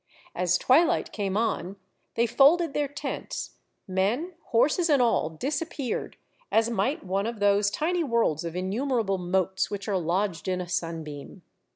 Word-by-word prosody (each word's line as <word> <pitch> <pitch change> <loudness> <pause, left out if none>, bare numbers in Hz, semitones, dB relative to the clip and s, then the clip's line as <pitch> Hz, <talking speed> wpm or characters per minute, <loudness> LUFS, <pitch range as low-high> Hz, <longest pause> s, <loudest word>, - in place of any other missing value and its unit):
As 180 0 +2
twilight 330 - +3
came 200 -2 -2
on, 205 -4 -1 0.4
they 235 - +3
folded 290 +6 +4
their 290 0 0
tents; 285 - -5 0.3
men, 210 - 0
horses, 300 +9 +2
and 285 -3 +4
all 235 -10 +2
disappeared, 275 - -3 0.3
as 225 +1 +3
might 235 +7 0
one 195 +3 -1
of 230 -2 -5
those 205 0 +3
tiny 335 - 0
worlds 230 - +1
of 170 0 -5
innumerable 200 +1 -1
motes 190 +1 0
which 205 0 -5
are 195 -3 +1
lodged 180 +1 -1
in 185 -1 0
a 180 - -4
sunbeam. 165 -5 -5
205 Hz, 150 wpm, -27 LUFS, 185-270 Hz, 0.4 s, folded